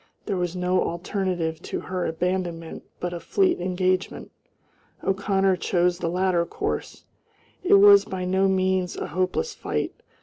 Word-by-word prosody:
There 200 Hz, -, -1 dB
was 180 Hz, -1 st, -2 dB
no 180 Hz, 0 st, +1 dB
alternative 175 Hz, -2 st, -2 dB
to -, -, -4 dB
her 185 Hz, -1 st, -3 dB
abandonment 170 Hz, -1 st, -3 dB, 0.2 s
but 175 Hz, 0 st, -3 dB
a 175 Hz, -, -4 dB
fleet 375 Hz, -, +1 dB
engagement. 185 Hz, +1 st, -1 dB, 0.7 s
O'Connor 195 Hz, -1 st, +1 dB
chose 175 Hz, 0 st, +1 dB
the 170 Hz, -, -1 dB
latter 180 Hz, -1 st, +1 dB
course. -, -, -4 dB, 0.6 s
It 390 Hz, +2 st, +5 dB
was 400 Hz, 0 st, +8 dB
by 185 Hz, -1 st, -4 dB
no 190 Hz, +1 st, +2 dB
means 185 Hz, -1 st, 0 dB
a -, -, -4 dB
hopeless 185 Hz, -, -1 dB
fight. -, -, -3 dB
185 Hz, 140 wpm, -25 LUFS, 175-190 Hz, 0.7 s, was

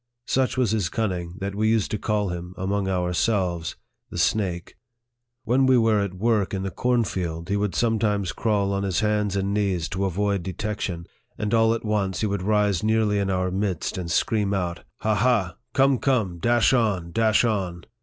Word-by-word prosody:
Such 130 Hz, 0 st, 0 dB
was 125 Hz, -5 st, +2 dB
his 105 Hz, -7 st, 0 dB
cunning, 90 Hz, -6 st, -2 dB
that 100 Hz, 0 st, -3 dB
we 110 Hz, +2 st, +1 dB
used 110 Hz, -2 st, +1 dB
to 105 Hz, -, -2 dB
call 105 Hz, -2 st, 0 dB
him, 90 Hz, +1 st, -6 dB
among 95 Hz, +1 st, -1 dB
ourselves, 90 Hz, -1 st, 0 dB, 0.2 s
" -, -, -54 dB
the -, -, -7 dB
snake." 90 Hz, -5 st, 0 dB, 0.7 s
When 130 Hz, +3 st, +3 dB
we 130 Hz, -1 st, +5 dB
were 110 Hz, -2 st, +3 dB
at 100 Hz, -2 st, -2 dB
work 105 Hz, -1 st, +1 dB
in 95 Hz, -, -3 dB
the 95 Hz, -, -3 dB
cornfield, 95 Hz, -8 st, -1 dB
he 100 Hz, -, +1 dB
would 100 Hz, -1 st, -1 dB
sometimes 105 Hz, -5 st, +1 dB
crawl 100 Hz, -3 st, 0 dB
on 100 Hz, -, -1 dB
his 95 Hz, -3 st, 0 dB
hands 105 Hz, -2 st, +1 dB
and 100 Hz, 0 st, 0 dB
knees 95 Hz, -6 st, 0 dB
to 95 Hz, +1 st, -1 dB
avoid 100 Hz, +1 st, 0 dB
de 90 Hz, +2 st, -5 dB
tection, 95 Hz, -3 st, -4 dB, 0.3 s
and 105 Hz, +1 st, -2 dB
all 115 Hz, 0 st, +4 dB
at 115 Hz, -, -6 dB
once 100 Hz, -3 st, -1 dB
he -, -, +1 dB
would 100 Hz, -2 st, -1 dB
rise 105 Hz, -2 st, +2 dB
nearly 110 Hz, -1 st, +2 dB
in 100 Hz, -1 st, -1 dB
our 90 Hz, -1 st, 0 dB
midst, 95 Hz, -3 st, -2 dB
and 90 Hz, -2 st, -4 dB
scream 105 Hz, +2 st, +1 dB
out, 90 Hz, -2 st, -3 dB
" -, -, -38 dB
Ha, 110 Hz, 0 st, +1 dB
ha! 105 Hz, -4 st, +1 dB, 0.2 s
Come, 135 Hz, -2 st, +4 dB
come! 110 Hz, -11 st, 0 dB
Dash 120 Hz, +5 st, +3 dB
on, 100 Hz, -9 st, +1 dB
dash 110 Hz, +3 st, +3 dB
on 95 Hz, -6 st, -2 dB
100 Hz, 195 wpm, -24 LUFS, 95-110 Hz, 0.7 s, we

